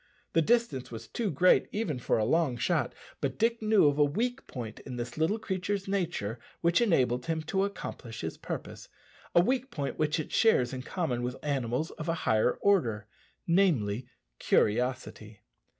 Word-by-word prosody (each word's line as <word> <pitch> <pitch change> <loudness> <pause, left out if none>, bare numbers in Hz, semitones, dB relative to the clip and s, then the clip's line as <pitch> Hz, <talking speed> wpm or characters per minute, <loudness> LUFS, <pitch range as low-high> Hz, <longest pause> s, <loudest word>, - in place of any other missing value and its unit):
The 165 - +4
distance 230 - +1
was 115 -2 -8
too 230 -4 -2
great 180 +4 +4
even 185 - -2
for - - +1
a 110 - +1
long 145 -1 +2
shot; - - 0 0.2
but - - -2
Dick 230 +1 +1
knew 215 -5 +4
of 145 0 +3
a - - +7
weak 240 - -1
point 115 -4 -7
in 130 - -8
this 120 0 -5
little 160 +8 +1
creature's 195 -2 -3
nature 170 - -2 0.2
which 170 +5 +3
enabled 125 - +2
him 160 -1 -1
to 190 +5 0
accomplish 130 - -7
his 80 - -4
purpose - - -7 0.5
a 170 - +8
weak 255 +6 0
point 145 - -4
which 155 +1 +1
it 155 - -5
shares 130 - +3
in 130 - -4
common 130 -4 -2
with 125 +1 -3
animals 135 0 -1
of 155 +1 -6
a 165 - +1
higher 110 +3 +3
order 120 - +2 0.4
namely, 130 - +2 0.3
curiosity. 110 -2 0
155 Hz, 170 wpm, -29 LUFS, 125-195 Hz, 0.5 s, a